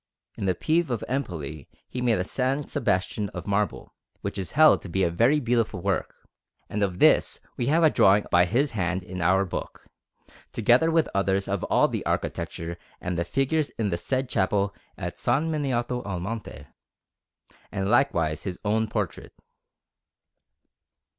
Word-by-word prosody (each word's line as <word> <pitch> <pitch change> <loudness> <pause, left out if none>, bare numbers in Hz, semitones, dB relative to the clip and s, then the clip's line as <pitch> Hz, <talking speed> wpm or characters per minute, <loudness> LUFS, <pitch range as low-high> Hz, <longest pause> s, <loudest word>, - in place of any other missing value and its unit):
In 100 - -3
the 90 - +2
Pieve 165 - +1
of 120 -3 -2
Empoli 80 - -4 0.2
he 125 - -5
made 120 -3 +2
a - - 0
S. 130 +8 -1
Sebastian 105 -5 0
of 90 - -5
marble, 100 0 -1 0.3
which - - -4
is 95 -2 -4
held 155 +1 +6
to 95 - -8
be 95 +2 0
a 85 - +2
very 120 - +3
beautiful 115 -6 0
work; - - -3 0.4
and 105 - -3
of 95 -3 0
this - - +4 0.2
we 120 - -2
have 160 +4 +3
a 155 - +6
drawing 100 +2 +4
by 90 0 +5
his 130 +10 +1
hand 95 -3 -1
in 90 0 -6
our 95 +3 +3
book, 90 - -6 0.7
together 120 +8 +4
with 165 -1 +3
others 100 0 +1
of - - -2
all - - +3
the - - -3
architecture 85 +1 -3 0.2
and 90 0 -3
the 85 - 0
figures 135 - 0
in 105 -3 0
the - - +1
said 130 +9 -1
chapel 100 -2 +1 0.2
in - - -10
S. - - -5
Miniato 130 -3 0
al 95 -3 -4
Monte, 105 +5 -6 1.1
and 95 -1 -2
likewise 85 - +2
his 90 -3 -5
own 110 +2 +1
portrait. 105 -7 -4
105 Hz, 165 wpm, -26 LUFS, 90-130 Hz, 1.1 s, held